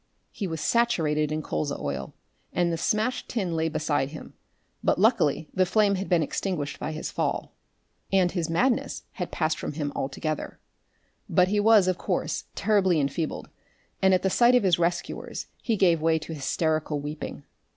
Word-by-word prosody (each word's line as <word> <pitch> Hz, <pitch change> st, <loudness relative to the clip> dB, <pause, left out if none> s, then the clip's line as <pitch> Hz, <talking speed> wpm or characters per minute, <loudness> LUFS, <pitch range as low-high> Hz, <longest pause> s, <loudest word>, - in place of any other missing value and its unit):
He 200 Hz, -, -4 dB
was 160 Hz, -2 st, -4 dB
saturated 155 Hz, -8 st, +2 dB
in 155 Hz, 0 st, -2 dB
colza 145 Hz, -1 st, -2 dB
oil, 70 Hz, -2 st, -4 dB, 0.4 s
and 175 Hz, -1 st, +1 dB
the -, -, +1 dB
smashed 215 Hz, +8 st, 0 dB
tin 190 Hz, -8 st, -1 dB
lay 160 Hz, 0 st, +1 dB
beside 150 Hz, -3 st, 0 dB
him, 155 Hz, -, -10 dB, 0.5 s
but -, -, +2 dB
luckily 190 Hz, -, +3 dB
the 185 Hz, -, +3 dB
flame 205 Hz, +2 st, +3 dB
had 195 Hz, 0 st, -3 dB
been 175 Hz, -3 st, +3 dB
extinguished 150 Hz, -2 st, -3 dB
by 155 Hz, -, -3 dB
his 155 Hz, +1 st, -5 dB
fall. -, -, -2 dB, 0.6 s
And 185 Hz, -2 st, +3 dB
his 170 Hz, -4 st, -2 dB
madness 240 Hz, +9 st, +1 dB
had 180 Hz, -, -4 dB
passed 155 Hz, -1 st, 0 dB
from -, -, -4 dB
him 145 Hz, -1 st, -3 dB
altogether. 150 Hz, +3 st, -3 dB, 0.7 s
But 180 Hz, 0 st, +4 dB
he 210 Hz, +1 st, +2 dB
was, 210 Hz, -2 st, +6 dB
of 185 Hz, -1 st, 0 dB
course, -, -, -2 dB
terribly 190 Hz, -6 st, +3 dB
enfeebled, 145 Hz, +3 st, -2 dB, 0.5 s
and 190 Hz, -, +5 dB
at 185 Hz, -1 st, +3 dB
the 190 Hz, -, +2 dB
sight 245 Hz, +4 st, +5 dB
of 245 Hz, -, +4 dB
his 180 Hz, -3 st, +3 dB
rescuers 175 Hz, +1 st, -2 dB, 0.2 s
he 225 Hz, -3 st, 0 dB
gave 175 Hz, -5 st, +3 dB
way 160 Hz, 0 st, +3 dB
to 160 Hz, +1 st, -6 dB
hysterical 155 Hz, 0 st, -1 dB
weeping. 145 Hz, +2 st, -6 dB
170 Hz, 170 wpm, -26 LUFS, 155-195 Hz, 0.7 s, was